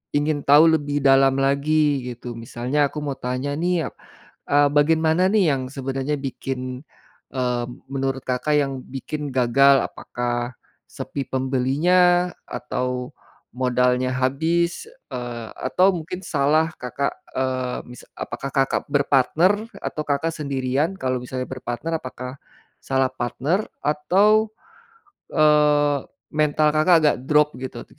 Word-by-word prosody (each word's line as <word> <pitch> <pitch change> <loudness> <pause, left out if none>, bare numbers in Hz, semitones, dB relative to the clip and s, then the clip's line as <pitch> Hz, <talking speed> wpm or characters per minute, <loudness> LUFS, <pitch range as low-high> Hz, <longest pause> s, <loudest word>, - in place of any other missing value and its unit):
ingin 145 +1 +1
tahu 145 +2 +8
lebih 145 -1 -2
dalam 135 0 +5
lagi 140 0 +2
gitu, 120 +1 -10 0.2
misalnya 125 +5 -3
aku 150 - -11
mau 140 -2 -3
tanya 130 +3 -2
nih 175 +3 0
a - - -6 0.6
eee, 145 0 +5
bagaimana 160 +3 +3
nih 210 -3 +4
yang 135 -1 -1
sebenarnya 135 +2 -2
bikin, 135 0 -4 0.7
eee, 125 -2 -1 0.3
menurut 135 -1 -2
Kakak 130 +4 +1
yang 135 -1 -2 0.2
bikin 150 +3 -5
gagal, 135 +3 +5
apakah 120 0 -4 0.4
sepi 140 - -4
pembelinya 165 +8 +2 0.2
atau 125 0 -3 0.4
modalnya 125 0 +1
habis, 165 - 0 0.3
eee 120 -2 -5 0.2
atau 185 +1 +3
mungkin 170 +3 -6
salah 155 0 +2 0.2
Kakak, 125 +3 -2 0.3
eee, 130 -1 -1
mis 125 - -11
apakah 120 +3 -5
Kakak 135 0 +2
berpartner 145 +5 +3 0.3
atau 155 - -4
Kakak 145 +3 0
sendirian? 140 +3 -1
Kalau 130 -1 0
misalnya 125 0 -4
berpartner 130 +6 -4
apakah 130 0 -7 0.4
salah 130 -1 0
partner 140 +9 -1 0.2
atau, 200 +9 +3 0.8
eee, 150 -1 +4 0.3
mental 150 0 +2
Kakak 155 +4 +5
agak 150 - +5
drop 150 0 +5
gitu, 125 -2 -6
140 Hz, 120 wpm, -22 LUFS, 130-155 Hz, 0.8 s, tahu